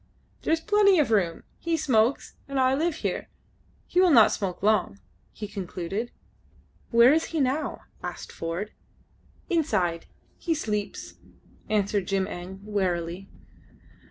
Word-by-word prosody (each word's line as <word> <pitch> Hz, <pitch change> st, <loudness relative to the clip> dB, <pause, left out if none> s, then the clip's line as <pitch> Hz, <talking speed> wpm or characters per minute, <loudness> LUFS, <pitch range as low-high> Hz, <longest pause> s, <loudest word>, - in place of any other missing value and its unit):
"There -, -, -1 dB
is 325 Hz, 0 st, +2 dB
plenty 410 Hz, -1 st, +4 dB
of 290 Hz, -7 st, +2 dB
room. 180 Hz, -6 st, +1 dB, 0.2 s
He 335 Hz, -1 st, 0 dB
smokes, 250 Hz, -3 st, +1 dB
and 275 Hz, -1 st, -2 dB
I 260 Hz, 0 st, +4 dB
live 315 Hz, +3 st, 0 dB
here. -, -, -2 dB, 0.6 s
He 360 Hz, -, +2 dB
will 370 Hz, -, +6 dB
not 235 Hz, -9 st, +7 dB
smoke 190 Hz, -2 st, -3 dB
long," 210 Hz, -, +2 dB, 0.3 s
he 210 Hz, -, -7 dB
concluded. 195 Hz, +3 st, -4 dB, 0.8 s
"Where 235 Hz, +3 st, +7 dB
is 320 Hz, +1 st, +2 dB
he 325 Hz, -, -3 dB
now?" 275 Hz, +3 st, 0 dB, 0.2 s
asked -, -, -6 dB
Ford. 170 Hz, +6 st, -4 dB, 0.8 s
"Inside. 190 Hz, -, 0 dB, 0.3 s
He 330 Hz, -2 st, 0 dB
sleeps," 210 Hz, -, -4 dB, 0.5 s
answered 205 Hz, -2 st, +1 dB
Jim 195 Hz, -1 st, +1 dB
Eng, 185 Hz, +2 st, -8 dB
wearily. 185 Hz, -3 st, -2 dB
215 Hz, 130 wpm, -26 LUFS, 190-300 Hz, 0.8 s, not